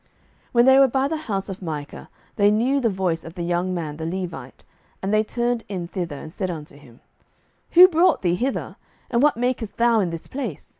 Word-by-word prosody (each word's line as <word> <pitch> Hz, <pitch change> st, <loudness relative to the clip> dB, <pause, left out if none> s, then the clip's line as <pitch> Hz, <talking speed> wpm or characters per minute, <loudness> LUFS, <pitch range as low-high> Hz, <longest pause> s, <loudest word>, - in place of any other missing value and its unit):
07:018:003 -, -, -37 dB, 0.4 s
When 240 Hz, 0 st, +5 dB
they 265 Hz, +1 st, +7 dB
were 275 Hz, -, +7 dB
by 265 Hz, +2 st, 0 dB
the 320 Hz, -, -2 dB
house 210 Hz, -11 st, -3 dB
of 195 Hz, -1 st, -7 dB
Micah, 150 Hz, -4 st, -6 dB, 0.3 s
they 205 Hz, -1 st, +4 dB
knew 240 Hz, +7 st, +2 dB
the 235 Hz, -4 st, +1 dB
voice 185 Hz, -4 st, -1 dB
of 165 Hz, +1 st, -10 dB
the 175 Hz, -, -4 dB
young 175 Hz, +2 st, -1 dB
man 160 Hz, -4 st, -4 dB
the 160 Hz, -, -5 dB
Levite: 170 Hz, -7 st, -6 dB, 0.4 s
and 195 Hz, +2 st, -2 dB
they 215 Hz, 0 st, +4 dB
turned 240 Hz, +1 st, -1 dB
in 180 Hz, -4 st, -4 dB
thither, 170 Hz, -5 st, -5 dB
and 155 Hz, +3 st, -10 dB
said 190 Hz, -1 st, -3 dB
unto 155 Hz, -5 st, -7 dB
him, 130 Hz, -5 st, -18 dB, 0.7 s
Who 360 Hz, +2 st, +10 dB
brought 350 Hz, -, +2 dB
thee 175 Hz, -1 st, +2 dB
hither? 255 Hz, +9 st, -3 dB, 0.3 s
and 235 Hz, -1 st, +2 dB
what 295 Hz, -4 st, +3 dB
makest 240 Hz, -3 st, -2 dB
thou 235 Hz, -1 st, +3 dB
in 185 Hz, -4 st, 0 dB
this 165 Hz, -1 st, -7 dB
place? 250 Hz, -, -6 dB
195 Hz, 215 wpm, -23 LUFS, 170-245 Hz, 0.7 s, Who